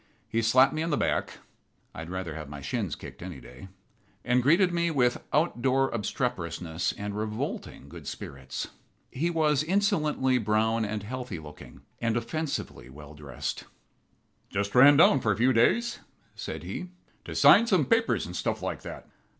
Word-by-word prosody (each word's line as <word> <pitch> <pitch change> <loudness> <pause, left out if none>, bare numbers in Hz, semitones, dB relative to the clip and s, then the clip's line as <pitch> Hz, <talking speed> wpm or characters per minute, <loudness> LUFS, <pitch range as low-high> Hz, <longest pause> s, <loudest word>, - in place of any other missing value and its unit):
He 115 - 0
slapped 130 +4 +5
me 155 - -2
on 165 - -1
the 150 - +1
back - - 0 0.6
(I - - -9
would 80 +1 -7
rather 95 -3 -4
have 75 -2 -7
my 70 0 -7
shins 95 - -3
kicked - - -11
any - - -7
day), 65 +9 -12 0.6
and 125 +1 +3
greeted 175 +7 +4
me 170 0 +1
with 125 -6 +1
out 150 -4 +1
door 135 +1 +2
obstreperousness 90 -7 -2
and 100 0 -5
revolting 105 0 -4
good - - -11
spirits. 65 -2 -6 0.4
He 165 +6 -1
was 155 -4 +2
insolently 155 -7 +1
brown 110 +1 +1
and 105 0 -4
healthy 125 -3 -5
looking, 75 -1 -12 0.2
and 115 -1 0
offensively 150 - -4
well 75 +2 -12
dressed. 75 -4 -5 0.8
"Just 100 0 -2
ran 140 +3 +8
down 145 -3 +6
for 110 - +2
a - - -6
few 125 +3 +3
days," 235 - +2 0.3
said - - -6
he, 180 - -6 0.4
"to - - -7
sign 230 +3 +7
some 185 -10 +3
papers 225 - +2
and - - -8
stuff - - -2
like - - -3
that. - - -9
120 Hz, 165 wpm, -28 LUFS, 95-150 Hz, 0.8 s, ran